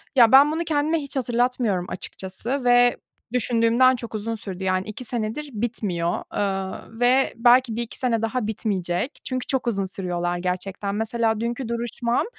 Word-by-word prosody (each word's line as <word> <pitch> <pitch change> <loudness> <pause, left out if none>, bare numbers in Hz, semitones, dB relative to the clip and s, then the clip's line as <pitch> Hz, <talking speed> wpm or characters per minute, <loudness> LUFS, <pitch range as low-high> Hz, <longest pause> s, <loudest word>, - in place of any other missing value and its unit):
ya 235 -4 +7
ben 280 +3 +8
bunu 325 +2 -1
kendime 315 0 +1
hiç 280 -2 -7
hatırlatmıyorum 240 -6 0
açıkçası 225 +9 -5
ve 245 0 +5 0.4
düşündüğümden 240 +1 +3
çok 235 -2 -7
uzun 225 +2 -3
sürdü. 190 -3 -7
Yani 185 +1 0
2 215 +4 -7
senedir 240 +6 -3
bitmiyor, 205 -7 -2
eee, 195 -2 -2 0.2
ve 255 +2 +3
belki 240 0 +5
1-2 235 0 -4
sene 240 -4 0
daha 225 0 -1
bitmeyecek 200 - -2
çünkü 255 -1 -3
çok 265 -2 -1
uzun 200 -4 0
sürüyorlar 175 -2 -2
gerçekten. 190 +3 -3
Mesela 225 0 0
dünkü 235 +2 -3
duruşmam, 235 +1 -1
230 Hz, 150 wpm, -24 LUFS, 200-250 Hz, 0.4 s, ben